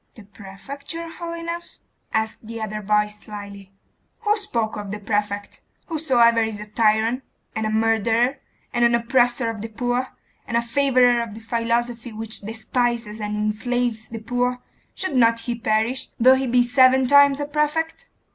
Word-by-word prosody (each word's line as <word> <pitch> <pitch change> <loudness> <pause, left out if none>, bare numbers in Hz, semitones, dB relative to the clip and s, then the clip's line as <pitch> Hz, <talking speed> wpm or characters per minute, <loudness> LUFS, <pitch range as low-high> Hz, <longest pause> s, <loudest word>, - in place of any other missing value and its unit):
'The 220 - -12
prefect, 205 +9 -10
your 335 0 -6
holiness?' 335 0 -6 0.3
asked 220 0 -1
the 230 0 -6
other 215 -1 -4
voice 210 0 +1
slily. 200 -2 -9 0.5
'Who 420 -2 +2
spoke 235 - -2
of 205 -1 -6
the 210 - -4
prefect? 205 -1 -3 0.3
Whosoever 245 -8 +3
is 220 -2 -2
a 210 - -6
tyrant, 220 +3 +2 0.3
and 220 0 -1
a - - -1
murderer, 225 +3 +2 0.3
and 240 -1 +2
an 235 0 +5
oppressor 240 0 +2
of 220 -2 -8
the 225 - -4
poor, 245 +3 -1 0.4
and 235 - 0
a - - +3
favourer 250 -1 +3
of 225 -3 -6
the - - -8
philosophy 235 +1 -1
which 220 0 -4
despises 225 +1 -2
and 210 0 -3
enslaves 220 +1 -1
the 230 - -7
poor, 245 +3 -1 0.4
should 375 -7 -2
not 230 -2 +4
he 240 - -3
perish, 225 +2 0
though 255 +3 +7
he 265 0 0
be 245 0 +4
seven 255 +1 +5
times 280 +1 +6
a 290 - -1
prefect? 310 +9 -1
235 Hz, 165 wpm, -23 LUFS, 215-255 Hz, 0.5 s, though